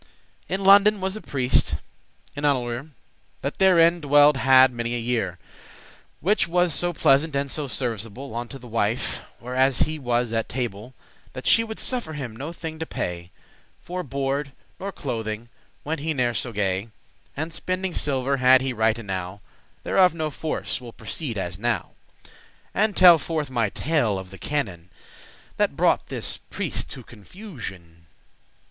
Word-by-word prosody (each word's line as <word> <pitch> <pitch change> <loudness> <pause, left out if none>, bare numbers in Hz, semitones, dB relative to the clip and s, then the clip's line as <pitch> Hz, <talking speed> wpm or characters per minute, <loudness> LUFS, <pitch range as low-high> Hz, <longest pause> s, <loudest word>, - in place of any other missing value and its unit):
In 195 +1 -2
London 200 +2 +7
was 190 +1 -2
a 215 - -6
priest, 130 -3 +1 0.6
an 145 - -5
annualere, 125 -4 +1
<12> 145 +5 -13 0.5
That 140 - -4
therein 175 -3 +5
dwelled 145 0 +6
hadde 130 -1 +6
many 120 0 -2
a - - -1
year, 115 -7 -1 0.8
Which 205 +5 +2
was 175 -1 +2
so 175 0 +1
pleasant 150 -1 +3
and 140 0 -1
so 150 -2 -2
serviceable 120 +1 -4
Unto 120 +3 -5
the 125 - -14
wife, 115 0 -1 0.2
where 125 +1 -7
as 130 0 +3
he 155 0 +1
was 120 -3 0
at 115 -1 -1
table, 120 -1 -4 0.4
That 130 - -8
she 230 - +5
would 220 -1 -7
suffer 245 -11 -1
him 130 -7 -6
no 140 +8 -5
thing 160 -2 -7
to 160 - -4
pay 85 0 -4 0.5
For 180 +1 -5
board 140 -1 -2 0.3
nor 200 +1 -4
clothing, 115 - -4 0.3
went 155 +1 -3
he 155 +1 -2
ne'er 120 -2 +1
so 120 - -1
gay; 100 0 -1 0.5
And 160 +2 -3
spending 185 +1 -2
silver 140 -2 0
had 130 0 +6
he 130 -1 -2
right 110 0 +2
enow; 95 -3 -5 0.4
Thereof 185 -3 +4
no 155 -2 -2
force;* 155 -2 -3
will 120 -2 -10
proceed 115 +2 -3
as 90 -2 -4
now, 120 +2 0
*no 120 - 0 0.4
matter - - -18 0.4
And 210 -1 +1
telle 175 -3 +9
forth 155 -3 -3
my 115 -4 +1
tale 125 -7 0
of 95 -1 -8
the 95 - -11
canon, 95 - -3 0.7
That - - +1
brought - - +2
this - - -4
prieste - - -3
to - - -8
confusion. 100 - -10
130 Hz, 165 wpm, -24 LUFS, 115-160 Hz, 0.8 s, telle